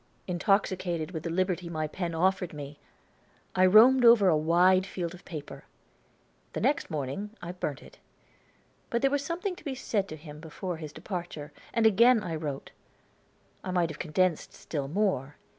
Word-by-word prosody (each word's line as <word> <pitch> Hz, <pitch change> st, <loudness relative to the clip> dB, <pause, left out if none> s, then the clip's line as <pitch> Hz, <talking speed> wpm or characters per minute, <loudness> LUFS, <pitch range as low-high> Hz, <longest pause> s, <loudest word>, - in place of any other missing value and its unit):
Intoxicated 180 Hz, -3 st, 0 dB
with 160 Hz, -3 st, -5 dB
the 170 Hz, -, -4 dB
liberty 180 Hz, 0 st, -1 dB
my 155 Hz, -2 st, -2 dB
pen 170 Hz, +2 st, -4 dB
offered 180 Hz, 0 st, +1 dB
me, 145 Hz, 0 st, -8 dB, 0.8 s
I 185 Hz, 0 st, +5 dB
roamed 240 Hz, +6 st, +7 dB
over 230 Hz, -5 st, +7 dB
a 165 Hz, -, +4 dB
wide 175 Hz, +4 st, +4 dB
field 175 Hz, -3 st, -4 dB
of 180 Hz, -, -13 dB
paper. 155 Hz, -5 st, -8 dB, 0.9 s
The -, -, -3 dB
next 285 Hz, -, +1 dB
morning 155 Hz, +6 st, -3 dB
I 175 Hz, 0 st, -6 dB
burnt 155 Hz, -6 st, -5 dB
it. -, -, -16 dB, 0.9 s
But 235 Hz, +2 st, -1 dB
there 275 Hz, -, +4 dB
was 285 Hz, 0 st, 0 dB
something 360 Hz, +5 st, -3 dB
to -, -, -15 dB
be 280 Hz, -4 st, -4 dB
said 205 Hz, -6 st, -1 dB
to 155 Hz, -, -7 dB
him 150 Hz, -1 st, -11 dB
before 165 Hz, +2 st, -5 dB
his 155 Hz, -2 st, -7 dB
departure, 165 Hz, -3 st, -6 dB, 0.2 s
and 230 Hz, -1 st, +1 dB
again 230 Hz, +2 st, +5 dB
I 170 Hz, -, -4 dB
wrote. 150 Hz, -3 st, -5 dB, 0.9 s
I -, -, -5 dB
might 175 Hz, -3 st, +1 dB
have 150 Hz, -, -10 dB
condensed 175 Hz, 0 st, 0 dB
still 145 Hz, -4 st, -4 dB
more. 150 Hz, -5 st, -1 dB
180 Hz, 170 wpm, -28 LUFS, 155-200 Hz, 0.9 s, roamed